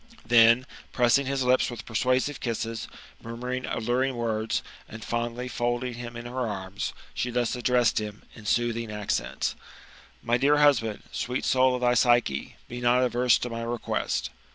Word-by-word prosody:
Then, 115 Hz, +1 st, +6 dB, 0.3 s
pressing 125 Hz, +2 st, +3 dB
his 135 Hz, -1 st, 0 dB
lips 125 Hz, +1 st, +3 dB
with 120 Hz, -3 st, -7 dB
persuasive 130 Hz, +5 st, 0 dB
kisses, 115 Hz, -1 st, -3 dB, 0.4 s
mnr 115 Hz, 0 st, -7 dB
muring 125 Hz, +1 st, -3 dB
alluring 125 Hz, +3 st, 0 dB
words, 110 Hz, -2 st, -1 dB, 0.3 s
and 115 Hz, 0 st, -9 dB
fondly 120 Hz, +1 st, -2 dB
folding 120 Hz, 0 st, -1 dB
him 120 Hz, 0 st, -7 dB
in 120 Hz, -, -8 dB
her 125 Hz, 0 st, -2 dB
anns, 95 Hz, -1 st, -4 dB, 0.2 s
she 125 Hz, -, -2 dB
thus 120 Hz, -1 st, 0 dB
addressed 125 Hz, -2 st, +2 dB
him, 105 Hz, 0 st, -7 dB
in 110 Hz, -3 st, -11 dB
soothing 115 Hz, 0 st, 0 dB
accents: 100 Hz, -, -2 dB, 0.4 s
" -, -, -24 dB
My 120 Hz, +1 st, +2 dB
dear 145 Hz, +4 st, +4 dB
husband, 130 Hz, -8 st, +3 dB
sweet 125 Hz, +1 st, -2 dB
soul 130 Hz, 0 st, +3 dB
of 125 Hz, -, -4 dB
thy 120 Hz, 0 st, +3 dB
Psyche, 120 Hz, -, +2 dB
be 120 Hz, +1 st, -7 dB
not 125 Hz, +1 st, +4 dB
averse 125 Hz, 0 st, +3 dB
to 125 Hz, -, -4 dB
my 115 Hz, 0 st, -4 dB
request." 120 Hz, +1 st, -2 dB
120 Hz, 165 wpm, -27 LUFS, 115-125 Hz, 0.4 s, Then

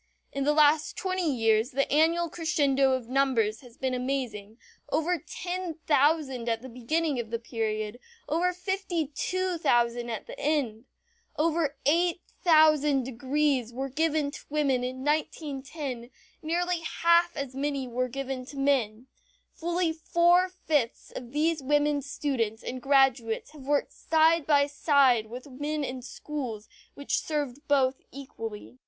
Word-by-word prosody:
In 275 Hz, 0 st, -1 dB
the 295 Hz, -, +4 dB
last 300 Hz, 0 st, +3 dB
twenty 370 Hz, -4 st, 0 dB
years 225 Hz, -2 st, +2 dB
the 275 Hz, 0 st, 0 dB
annual 330 Hz, +3 st, +3 dB
crescendo 285 Hz, -5 st, +2 dB
of 255 Hz, -3 st, -2 dB
numbers 245 Hz, -5 st, +1 dB
has 245 Hz, -2 st, -16 dB
been 260 Hz, -1 st, -1 dB
amazing; 250 Hz, -5 st, -3 dB, 0.3 s
over 325 Hz, +3 st, +1 dB
ten 355 Hz, +2 st, -5 dB
thousand 285 Hz, -5 st, +2 dB
at 225 Hz, +1 st, -1 dB
the 260 Hz, -, -8 dB
beginning 275 Hz, +4 st, -1 dB
of 230 Hz, -2 st, -4 dB
the 230 Hz, -, -1 dB
period, 220 Hz, -1 st, -3 dB, 0.3 s
over 345 Hz, +4 st, +1 dB
fifty 360 Hz, -4 st, -2 dB
two 370 Hz, +1 st, -1 dB
thousand 240 Hz, -3 st, +1 dB
at 225 Hz, -3 st, -4 dB
the -, -, -10 dB
end. 265 Hz, -7 st, -1 dB, 0.5 s
Over 315 Hz, -2 st, +1 dB
eight 345 Hz, +4 st, +2 dB, 0.2 s
thousand 305 Hz, -5 st, +5 dB
degrees 265 Hz, 0 st, 0 dB
were 265 Hz, +3 st, -4 dB
given 305 Hz, 0 st, 0 dB
to -, -, -8 dB
women 280 Hz, -4 st, +1 dB
in 255 Hz, +1 st, -4 dB
1910, 285 Hz, -4 st, -3 dB, 0.3 s
nearly 350 Hz, +2 st, 0 dB
half 340 Hz, +1 st, +2 dB
as 275 Hz, -2 st, -4 dB
many 275 Hz, 0 st, -2 dB
as 245 Hz, -, -10 dB
were 255 Hz, +1 st, 0 dB
given 270 Hz, 0 st, -4 dB
to 285 Hz, -, -10 dB
men. 255 Hz, -5 st, +1 dB, 0.5 s
Fully 345 Hz, 0 st, -1 dB
four 345 Hz, +3 st, +3 dB
fifths 300 Hz, -9 st, -1 dB
of 240 Hz, -1 st, -8 dB
these 310 Hz, +2 st, +1 dB
women 290 Hz, +1 st, +2 dB
students 255 Hz, -6 st, -2 dB
and 255 Hz, 0 st, -5 dB
graduates 270 Hz, -3 st, +2 dB
have 285 Hz, -3 st, -13 dB
worked 290 Hz, -1 st, +1 dB
side 320 Hz, 0 st, +3 dB
by 285 Hz, -2 st, +5 dB
side 280 Hz, -6 st, +3 dB
with 245 Hz, +3 st, -8 dB
men 290 Hz, +2 st, -3 dB
in 255 Hz, -1 st, -4 dB
schools 245 Hz, -4 st, -6 dB, 0.3 s
which 280 Hz, -, -1 dB
served 290 Hz, -4 st, -3 dB
both 270 Hz, -2 st, +2 dB
equally. 245 Hz, -3 st, -8 dB
280 Hz, 145 wpm, -28 LUFS, 250-315 Hz, 0.5 s, thousand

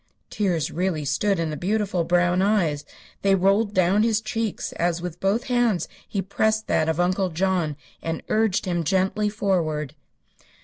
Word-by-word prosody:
Tears 180 Hz, -8 st, 0 dB
really 175 Hz, -4 st, -1 dB
stood 195 Hz, +8 st, +1 dB
in 165 Hz, -2 st, -1 dB
the -, -, -3 dB
beautiful 195 Hz, 0 st, 0 dB
brown 175 Hz, +1 st, +2 dB
eyes. 180 Hz, -8 st, +1 dB, 0.4 s
They 195 Hz, 0 st, +4 dB
rolled 200 Hz, +3 st, +2 dB
down 185 Hz, +3 st, +3 dB
his 225 Hz, -1 st, +2 dB
cheeks, 225 Hz, -1 st, -3 dB
as 175 Hz, 0 st, -1 dB
with 175 Hz, -1 st, -6 dB
both 200 Hz, +5 st, +1 dB
hands 240 Hz, -7 st, +1 dB, 0.2 s
he 195 Hz, -2 st, -2 dB
pressed 220 Hz, +3 st, 0 dB
that 155 Hz, -, +1 dB
of 160 Hz, +1 st, -1 dB
Uncle 185 Hz, +2 st, +1 dB
John 175 Hz, -3 st, 0 dB, 0.3 s
and 165 Hz, -1 st, -4 dB
urged 215 Hz, -3 st, +1 dB
him 175 Hz, -2 st, -1 dB
gently 190 Hz, +5 st, +1 dB
forward. 165 Hz, -, -1 dB
185 Hz, 160 wpm, -24 LUFS, 170-210 Hz, 0.4 s, They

